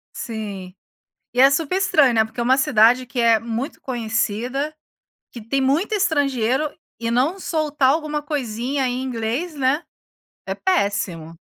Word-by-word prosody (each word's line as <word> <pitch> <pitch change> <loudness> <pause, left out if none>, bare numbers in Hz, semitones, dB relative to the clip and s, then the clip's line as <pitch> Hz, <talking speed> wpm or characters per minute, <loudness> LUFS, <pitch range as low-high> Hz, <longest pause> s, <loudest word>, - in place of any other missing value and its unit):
Sim. 205 -5 -6 0.6
E 245 - -1
é 270 - +8
super 320 +4 0
estranho, 310 -9 +4
né, 220 -1 +3
porque 220 +2 -10
é - - +1
uma 255 +2 +3
cidade 245 0 +4
que 245 +1 -5
é 230 -2 +4
muito 235 +5 -5
conhecida, 245 +4 -2 0.6
que 240 - -8
tem 230 +5 -1
muito 285 +10 +1
estrangeiro, 285 - +1 0.3
e 230 - -1
não 275 +11 +1
soltar 300 -6 +1
alguma 300 0 -1
coisinha 265 -2 -2
em 250 +1 -2
inglês, 255 +7 -3
né? 280 +2 +1 0.6
É - - -2
péssimo. 200 - -1
255 Hz, 145 wpm, -21 LUFS, 225-295 Hz, 0.6 s, é